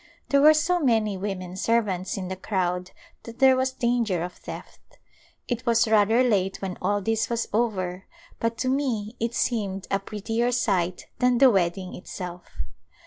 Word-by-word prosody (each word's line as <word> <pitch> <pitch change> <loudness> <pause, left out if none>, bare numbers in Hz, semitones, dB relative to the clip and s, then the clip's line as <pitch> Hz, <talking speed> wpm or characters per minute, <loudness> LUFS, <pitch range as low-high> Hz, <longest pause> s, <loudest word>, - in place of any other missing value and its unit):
There 280 0 +4
were 310 +1 +8
so 350 +4 +2
many 225 - +2
women 185 -2 -5
servants 195 -3 0
in 185 -2 -4
the 190 - -4
crowd 180 -2 -2 0.3
that 230 0 -11
there 265 -1 +6
was 260 0 0
danger 235 -8 0
of 180 0 -5
theft. - - -11 0.5
It 240 -1 -2
was 235 0 +4
rather 220 +3 +4
late 195 -6 +1
when 190 -2 -4
all 205 0 +1
this 225 +2 0
was 235 -1 -1
over, 195 -5 -1 0.3
but 230 0 -1
to 255 - -2
me 250 -5 -1
it 230 +1 -2
seemed 200 -5 -1
a 195 - +2
prettier 225 +4 -2
sight 185 -7 0
than 250 -1 +3
the 265 0 +7
weddmg 185 -1 0
itself. 180 -1 -7
215 Hz, 165 wpm, -25 LUFS, 190-240 Hz, 0.5 s, were